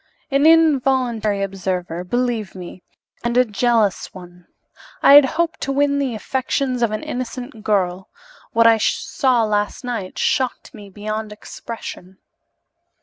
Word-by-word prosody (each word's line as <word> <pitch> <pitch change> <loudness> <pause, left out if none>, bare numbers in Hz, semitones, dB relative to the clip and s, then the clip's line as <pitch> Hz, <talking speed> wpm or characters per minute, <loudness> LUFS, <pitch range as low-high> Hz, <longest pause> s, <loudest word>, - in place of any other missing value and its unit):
"An 280 +3 +4
involuntary 260 -10 +3
observer, 185 -3 -3
believe 235 -1 -2
me 180 0 -9 0.4
and 240 0 0
a 250 - +5
jealous 220 -2 0
one. 175 -1 -13 0.6
I - - +8
had 290 -1 +9
hoped 335 -1 -1
to 275 - -2
win 280 +1 +1
the 265 -5 -1
affections 255 +2 -2
of 235 - +2
an 215 0 -4
innocent 245 -2 -6
girl. 190 -3 -1 0.4
What 230 0 +3
I 225 -1 +6
saw 250 +2 +1
last 210 +1 -1
night 230 -7 -5
shocked 260 +1 -1
me 205 -4 -11
beyond 215 +2 -5
expression." 210 -3 -9
225 Hz, 135 wpm, -20 LUFS, 200-255 Hz, 0.6 s, had